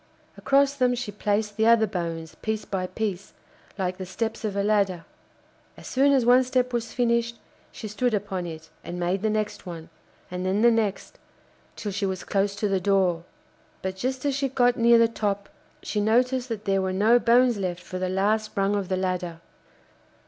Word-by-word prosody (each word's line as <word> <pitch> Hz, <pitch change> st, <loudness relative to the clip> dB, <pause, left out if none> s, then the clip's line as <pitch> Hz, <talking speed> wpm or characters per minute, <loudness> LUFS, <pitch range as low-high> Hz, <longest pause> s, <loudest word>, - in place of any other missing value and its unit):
Across 280 Hz, +1 st, +2 dB
them 250 Hz, -2 st, +2 dB
she 240 Hz, -3 st, -4 dB
placed 210 Hz, +1 st, -1 dB
the 220 Hz, 0 st, +3 dB
other 230 Hz, -1 st, +6 dB
bones, 165 Hz, -5 st, -4 dB
piece 220 Hz, -1 st, -2 dB
by 185 Hz, -2 st, -3 dB
piece, 200 Hz, -2 st, -4 dB, 0.4 s
like 185 Hz, -2 st, -2 dB
the 185 Hz, -, -5 dB
steps 220 Hz, +5 st, -3 dB
of 210 Hz, -2 st, -2 dB
a 200 Hz, -, 0 dB
ladder. 200 Hz, -5 st, +1 dB, 0.7 s
As -, -, -13 dB
soon 275 Hz, +2 st, +3 dB
as 265 Hz, -4 st, +3 dB
one 250 Hz, +2 st, +6 dB
step 250 Hz, -1 st, 0 dB
was 230 Hz, -1 st, -2 dB
finished 235 Hz, -1 st, +1 dB, 0.4 s
she 215 Hz, -, -7 dB
stood 215 Hz, +3 st, 0 dB
upon 190 Hz, -3 st, -3 dB
it 160 Hz, -1 st, -9 dB
and 175 Hz, +1 st, -6 dB
made 180 Hz, +2 st, 0 dB
the 220 Hz, -, +1 dB
next 215 Hz, -2 st, -2 dB
one, 165 Hz, -2 st, -8 dB, 0.4 s
and 180 Hz, 0 st, -4 dB
then 190 Hz, +4 st, +1 dB
the 240 Hz, -, +7 dB
next, 220 Hz, -4 st, -2 dB, 0.6 s
till 205 Hz, -, -4 dB
she 200 Hz, +1 st, -1 dB
was 190 Hz, -1 st, -4 dB
close 200 Hz, 0 st, 0 dB
to 210 Hz, -, -1 dB
the 195 Hz, -1 st, +1 dB
door. 185 Hz, -3 st, +1 dB, 0.6 s
But 190 Hz, 0 st, -3 dB
just 255 Hz, +6 st, -3 dB
as 285 Hz, -, +1 dB
she 275 Hz, -1 st, 0 dB
got 245 Hz, -1 st, +3 dB
near 235 Hz, 0 st, +5 dB
the 230 Hz, 0 st, +5 dB
top 205 Hz, -3 st, -3 dB, 0.3 s
she 210 Hz, -, -1 dB
noticed 250 Hz, +4 st, +2 dB
that 220 Hz, -2 st, -5 dB
there 195 Hz, -1 st, +2 dB
were 190 Hz, 0 st, -1 dB
no 220 Hz, +5 st, +4 dB
bones 240 Hz, 0 st, +4 dB
left 180 Hz, -2 st, -3 dB
for 185 Hz, -, -6 dB
the 185 Hz, 0 st, -1 dB
last 210 Hz, +4 st, 0 dB
rung 195 Hz, +1 st, +2 dB
of 200 Hz, -3 st, -2 dB
the 185 Hz, -, 0 dB
ladder. 180 Hz, -3 st, -2 dB
205 Hz, 195 wpm, -25 LUFS, 185-235 Hz, 0.7 s, the